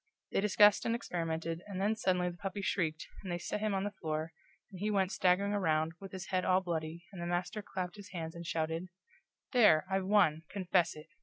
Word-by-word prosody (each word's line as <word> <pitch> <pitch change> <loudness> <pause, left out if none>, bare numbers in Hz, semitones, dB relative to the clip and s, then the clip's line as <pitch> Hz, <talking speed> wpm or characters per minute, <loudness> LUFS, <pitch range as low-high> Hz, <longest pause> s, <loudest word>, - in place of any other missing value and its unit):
They - - +2
discussed 205 0 +6
and 230 - +1
experimented, 165 -5 -3
and 195 -2 -5
then 210 +3 +2
suddenly 180 -4 +1
the 175 - -12
puppy 195 +1 -4
shrieked, 160 -5 -1
and 185 - -5
they 175 - 0
set 175 - -3
him 210 -1 0
on 190 - 0
the 205 - -2
floor, 160 -4 -3 0.4
and 185 - -9
he 210 +3 0
went 195 -2 +2
staggering 190 +2 +2
around, 160 -5 +1
with 195 -1 -9
his 190 -1 -7
head 185 -1 +1
all 185 0 +4
bloody, 165 -1 -4
and 180 - -7
the 170 - -3
master 175 +4 -1
clapped 185 -1 -5
his 205 -1 -10
hands 165 -3 -5
and 170 -1 -8
shouted: 165 +2 -1 0.6
"There, 210 - +6
I've 190 -1 0
won 185 -7 +4
confess 185 -3 +1
it! 155 +1 -12
185 Hz, 215 wpm, -33 LUFS, 165-200 Hz, 0.6 s, discussed